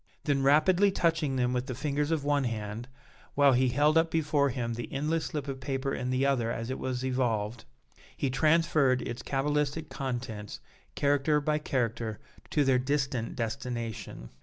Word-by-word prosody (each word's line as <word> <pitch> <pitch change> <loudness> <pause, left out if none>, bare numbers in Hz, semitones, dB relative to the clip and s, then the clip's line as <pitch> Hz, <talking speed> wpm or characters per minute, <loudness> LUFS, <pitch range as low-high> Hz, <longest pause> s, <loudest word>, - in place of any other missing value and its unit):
Then 140 -3 +1
rapidly 165 +8 +4
touching 165 -7 +1
them 125 -1 +1
with 125 +1 -1
the 130 - -4
fingers 145 +2 -1
of 160 -3 0
one 145 -1 +1
hand, 110 0 -4 0.5
while 140 -1 +5
he 130 +1 +3
held 150 +5 +4
up 165 0 +1
before 150 -3 +2
him 120 -2 -2
the 115 -1 -6
endless 155 +4 -1
slip 150 -2 -4
of 135 -1 -4
paper 135 0 -2
in 125 0 -3
the 130 +1 +1
other 125 -5 +1
as 115 +2 -4
it 130 - -4
was 130 0 -3
evolved, 120 -4 -1 0.5
he 135 - 0
transferred 155 -3 +3
its 120 +1 -5
cabalistic 150 +3 -1
contents, 120 -6 -5 0.4
character 145 +1 +2
by 150 +1 0
character, 115 -6 -2 0.3
to 150 - +2
their 130 -2 +3
distant 130 -3 -1
destination. 115 - -4
135 Hz, 165 wpm, -29 LUFS, 120-150 Hz, 0.5 s, while